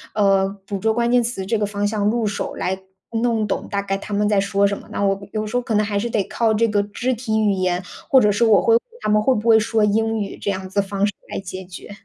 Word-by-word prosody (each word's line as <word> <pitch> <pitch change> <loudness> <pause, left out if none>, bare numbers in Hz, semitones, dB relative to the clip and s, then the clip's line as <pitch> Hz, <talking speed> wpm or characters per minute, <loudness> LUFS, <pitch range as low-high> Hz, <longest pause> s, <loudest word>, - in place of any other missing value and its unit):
呃， 195 -2 +3 0.2
捕 200 - -3
捉 220 +2 +1
关 235 +1 +1
键 245 0 +5
词 225 -5 -3
这 225 +4 0
个 210 - +1
方 205 0 -1
向 205 -1 0
入 230 0 0
手， 205 -1 -3
来 190 +1 -2 0.3
弄 230 -1 0
懂 - - -3
大 200 - -1
概 195 -1 -1
他 205 +1 -7
们 210 +1 +2
在 205 -1 +3
说 200 0 +1
什 200 0 0
么。 - - -13
那 - - -3
我 195 0 +1
有 215 -1 -2
时 215 +3 -5
候 245 - +2
可 230 -2 -2
能 210 0 +3
还 205 -1 -2
是 235 +3 -2
得 215 -3 0
靠 225 +3 0
这 230 +2 +3
个 210 -2 +1
肢 235 +5 -2
体 220 -2 -1
语 215 -1 +3
言， 185 -2 0 0.3
或 265 - +7
者 210 -4 +4
是 205 +4 +1
我 220 -3 +6
会 460 - +3
问 465 - +4 0.2
他 - - -3
们 210 0 +4
会 260 +5 +3
不 215 +2 -3
会 225 -1 +7
说 220 0 +1
英 225 +2 +1
语 200 - -4
这 - - -3
样 190 -1 -5
子 195 +2 0
方 200 0 -1
式 205 - -1 0.2
来 - - -4
解 185 0 -7
决。 180 -1 -11
210 Hz, 310 characters per minute, -21 LUFS, 200-225 Hz, 0.3 s, 或